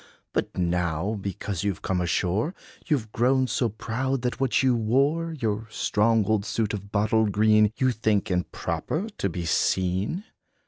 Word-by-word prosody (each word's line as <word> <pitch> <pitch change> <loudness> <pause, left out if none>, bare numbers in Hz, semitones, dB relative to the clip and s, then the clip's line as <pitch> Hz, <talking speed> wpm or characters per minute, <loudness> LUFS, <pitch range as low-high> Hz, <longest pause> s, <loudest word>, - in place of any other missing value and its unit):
But - - -2
now, 90 +3 0
because 100 -1 -4
you 100 -2 0
've - - -20
come 90 -1 0
ashore, 95 - 0 0.3
You 155 -4 +3
've 110 -4 -9
grown 130 +3 +2
so 120 -1 0
proud, 125 +5 -2
that 125 - -2
what 135 0 +2
you 130 -2 +4
wore 140 +9 +1
Your 110 -6 -2
strong 110 0 +2
old 110 -1 +1
suit 110 0 -1
of 100 -1 -6
bottle 110 +1 +2
green, 105 +1 +4
You 130 -1 +3
think 110 -4 0
improper 155 - -2
to 100 - 0
be 85 0 -4
seen. 95 - 0
110 Hz, 165 wpm, -26 LUFS, 100-125 Hz, 0.3 s, you